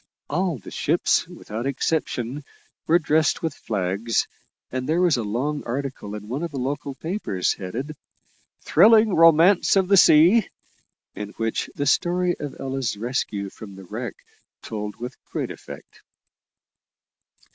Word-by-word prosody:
All 175 Hz, 0 st, 0 dB
the 105 Hz, -, -12 dB
ships, -, -, +1 dB
without 115 Hz, +5 st, -6 dB
exception, 140 Hz, -2 st, -2 dB, 0.5 s
were 165 Hz, -, +5 dB
dressed 155 Hz, -1 st, +1 dB
with 160 Hz, -3 st, -1 dB
flags, 105 Hz, -3 st, -1 dB, 0.5 s
and 130 Hz, +2 st, -3 dB
there 165 Hz, +2 st, +2 dB
was 180 Hz, -4 st, +4 dB
a 120 Hz, -, -1 dB
long 130 Hz, +8 st, -2 dB
article 125 Hz, -4 st, -4 dB
in 105 Hz, 0 st, -8 dB
one 130 Hz, +7 st, -3 dB
of 170 Hz, -, -2 dB
the 145 Hz, -, -7 dB
local 135 Hz, +1 st, -3 dB
papers 160 Hz, -, -1 dB
headed, 125 Hz, +11 st, -6 dB, 0.7 s
"Thrilling 215 Hz, +4 st, +5 dB
Romance 165 Hz, +4 st, +5 dB
of 190 Hz, -1 st, +2 dB
the 200 Hz, -, +6 dB
Sea," 180 Hz, +7 st, +6 dB, 0.6 s
in 105 Hz, 0 st, -7 dB
which 115 Hz, 0 st, -2 dB
the 145 Hz, -, -2 dB
story 175 Hz, +4 st, +2 dB
of 145 Hz, -2 st, -6 dB
Ella's 135 Hz, -4 st, -2 dB
rescue 105 Hz, -4 st, -3 dB
from 100 Hz, -3 st, -11 dB
the 95 Hz, -, -11 dB
wreck 110 Hz, +4 st, -6 dB, 0.5 s
told 105 Hz, -2 st, -5 dB
with 125 Hz, +2 st, -8 dB
great -, -, -4 dB
effect. -, -, -11 dB
135 Hz, 140 wpm, -23 LUFS, 110-165 Hz, 0.7 s, the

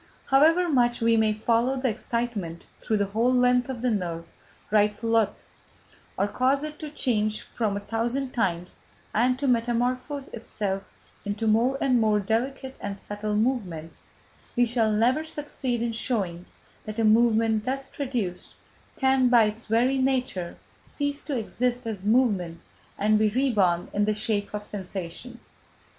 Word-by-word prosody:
"However 320 Hz, +6 st, +4 dB
much 245 Hz, -6 st, +2 dB
we 230 Hz, -1 st, +3 dB
may 220 Hz, -1 st, +3 dB
follow 230 Hz, +4 st, +1 dB
the 260 Hz, 0 st, 0 dB
excitement 220 Hz, -7 st, -3 dB, 0.2 s
through 220 Hz, -, 0 dB
the 200 Hz, -, +1 dB
whole 235 Hz, +3 st, +3 dB
length 250 Hz, 0 st, +3 dB
of 245 Hz, -2 st, -5 dB
the 250 Hz, -, +2 dB
nerve," 170 Hz, -5 st, -2 dB, 0.5 s
writes 210 Hz, +1 st, +2 dB
Lotze, 225 Hz, -2 st, 0 dB, 0.7 s
"or 200 Hz, -, +2 dB
cause 265 Hz, +6 st, +1 dB
it 305 Hz, 0 st, -6 dB
to 305 Hz, -, -6 dB
change 215 Hz, -7 st, 0 dB
its -, -, -7 dB
form 210 Hz, -4 st, -2 dB
a -, -, -5 dB
thousand 240 Hz, +5 st, -2 dB
times 180 Hz, -7 st, -2 dB, 0.3 s
and 250 Hz, +3 st, +2 dB
to 280 Hz, +1 st, -1 dB
metamorphose 250 Hz, +4 st, 0 dB
itself 200 Hz, -4 st, -4 dB, 0.4 s
into 205 Hz, +2 st, -3 dB
more 230 Hz, +5 st, +3 dB
and 255 Hz, -3 st, +3 dB
more 215 Hz, -1 st, +3 dB
delicate 260 Hz, +6 st, -2 dB
and 200 Hz, 0 st, -5 dB
subtle 205 Hz, +1 st, -4 dB
movements, 195 Hz, -9 st, -2 dB, 0.5 s
we 245 Hz, -1 st, +4 dB
shall 230 Hz, -2 st, +1 dB
never 240 Hz, +8 st, +2 dB
succeed 280 Hz, -6 st, -3 dB
in 235 Hz, -, -1 dB
showing 195 Hz, -7 st, -2 dB, 0.4 s
that 215 Hz, +1 st, -6 dB
a 225 Hz, -, +1 dB
movement 220 Hz, 0 st, +3 dB
thus 270 Hz, +1 st, -2 dB
produced 240 Hz, -10 st, -4 dB, 0.4 s
can, 265 Hz, -1 st, +3 dB
by 240 Hz, -2 st, +6 dB
its 215 Hz, +2 st, -3 dB
very 245 Hz, +5 st, +2 dB
nature, 255 Hz, -10 st, -1 dB, 0.3 s
cease 285 Hz, 0 st, -3 dB
to 285 Hz, -4 st, -3 dB
exist 245 Hz, +2 st, -2 dB
as 210 Hz, -4 st, -4 dB
movement 205 Hz, -7 st, +2 dB, 0.4 s
and 215 Hz, +1 st, +3 dB
be 215 Hz, 0 st, +3 dB
reborn 205 Hz, -8 st, +1 dB
in 205 Hz, 0 st, +2 dB
the 215 Hz, 0 st, +1 dB
shape 210 Hz, -2 st, -1 dB
of 210 Hz, -, -4 dB
sensation...." 195 Hz, +4 st, -7 dB
230 Hz, 155 wpm, -26 LUFS, 210-255 Hz, 0.7 s, by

